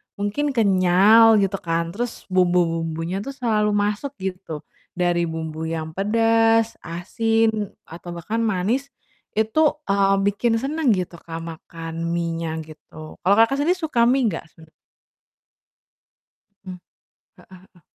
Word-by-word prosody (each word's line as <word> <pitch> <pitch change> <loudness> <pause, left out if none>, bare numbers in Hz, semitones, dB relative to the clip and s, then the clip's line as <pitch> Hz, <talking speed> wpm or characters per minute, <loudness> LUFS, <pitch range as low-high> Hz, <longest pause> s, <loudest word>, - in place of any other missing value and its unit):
mungkin 260 +8 -2
kenyal 205 +2 +5
gitu 195 0 -1
kan, 165 0 -2
terus 235 +5 -5
bumbu-bumbunya 170 -1 +1
tuh 275 +7 -6
selalu 215 -5 +1
masuk 210 +7 -1
gitu, 180 -5 -5 0.3
dari 175 -1 +1
bumbu 160 0 -5
yang 160 -1 -4
pedas, 225 +3 +2
asin 220 +4 -1
atau 170 +2 -11
bahkan 210 +7 -3
manis 225 +5 0 0.4
itu, 220 +9 +1 0.2
eee, 195 0 +3
bikin 225 +3 +1
seneng 280 0 0
gitu, 180 -3 -1
Kak, 165 -1 -8
makan 165 0 -7
mienya 165 -1 -2 0.2
gitu. 155 0 -12
Kalau 195 +3 +4
Kakak 230 +4 +4
sendiri 360 +3 +1
suka 300 -8 +1
mie 250 0 +3
nggak 165 - -3
sebener 160 -1 -18 2.0
Mmm, 185 -1 -7 0.6
heeh - - -19 0.2
heeh. 185 -1 -24
195 Hz, 125 wpm, -22 LUFS, 170-225 Hz, 2.0 s, kenyal